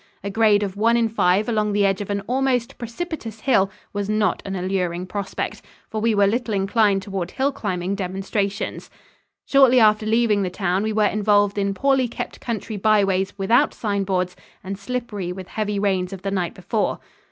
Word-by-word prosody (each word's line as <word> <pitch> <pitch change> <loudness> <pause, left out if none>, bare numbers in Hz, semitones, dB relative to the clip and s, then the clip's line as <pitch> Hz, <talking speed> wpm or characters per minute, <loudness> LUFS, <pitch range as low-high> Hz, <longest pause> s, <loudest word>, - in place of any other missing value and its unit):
A 200 - -3
grade 210 -1 +4
of 195 -1 -4
one 230 +3 +3
in 230 -1 +2
five 205 -1 +2
along 215 -3 0
the 205 0 +3
edge 195 0 +1
of 205 - -6
an 200 0 -1
almost 250 +2 -1
precipitous 235 - -6
hill 210 -8 +3 0.2
was 205 0 -3
not 215 0 +1
an 195 - -3
alluring 180 -1 -2
prospect, 200 +1 -4 0.3
for 215 -1 -2
we 225 -1 +2
were 200 0 +4
little 225 +1 0
inclined 195 0 +2
toward 190 -3 -4
hill 275 +6 0
climbing 185 -8 -3
demonstrations. 195 +1 -3 0.6
Shortly 265 -2 +5
after 215 -1 +4
leaving 220 -2 +3
the 185 - -1
town 185 0 -1
we 220 +1 -1
were 215 0 +2
involved 205 -1 +2
in 200 0 0
poorly 270 +1 +2
kept 235 - -6
country 220 -2 -4
byways 195 -2 +2
without 235 +9 +3
sign 200 -3 -1
boards 185 -2 -1 0.3
and 195 +1 -4
slippery 205 -3 -4
with 185 0 -8
heavy 210 -1 -2
rains 190 -2 0
of 190 - -9
the 195 - -2
night 180 -3 -2
before. 200 +3 -1
205 Hz, 185 wpm, -22 LUFS, 195-225 Hz, 0.6 s, Shortly